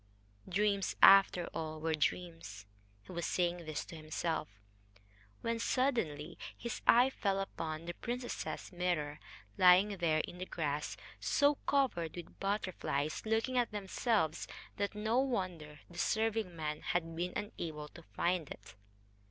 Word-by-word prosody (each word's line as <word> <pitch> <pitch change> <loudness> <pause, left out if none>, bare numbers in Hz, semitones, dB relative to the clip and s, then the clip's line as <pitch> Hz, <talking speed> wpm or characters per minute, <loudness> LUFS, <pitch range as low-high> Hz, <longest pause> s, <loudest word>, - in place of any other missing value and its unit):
Dreams, 200 +1 +1
after 195 -3 +8
all, 155 -1 -4
were 160 +1 0
dreams.... 165 - -2 0.4
He - - -12
was 170 -1 -2
saying 175 -1 0
this 155 -2 -3
to - - -9
himself, 160 +1 -2 0.9
when 230 0 -1
suddenly 180 - 0 0.2
his 235 -1 -4
eye 250 +3 +7
fell 195 -6 0
upon 165 -4 -4
the 175 - -4
princess's 245 +2 -4
mirror, 170 -5 -1 0.4
lying 185 +3 +6
there 160 -3 +2
in 175 - -8
the 185 - -4
grass 150 -2 -2 0.2
so 285 0 +4
covered 240 - +1
with 175 -2 -9
butterflies, 185 -7 -1
looking 225 +3 +2
at 240 - +1
themselves, 205 -4 0 0.3
that 200 +1 -1
no 220 +4 +1
wonder 180 - -2
the 175 0 -10
serving 220 -3 +1
men 150 -1 -3
had 165 -2 -1
been 180 +2 -2
unable 160 -7 -4
to 170 - -13
find 170 -2 -1
it. 100 - -10
180 Hz, 135 wpm, -34 LUFS, 160-210 Hz, 0.9 s, after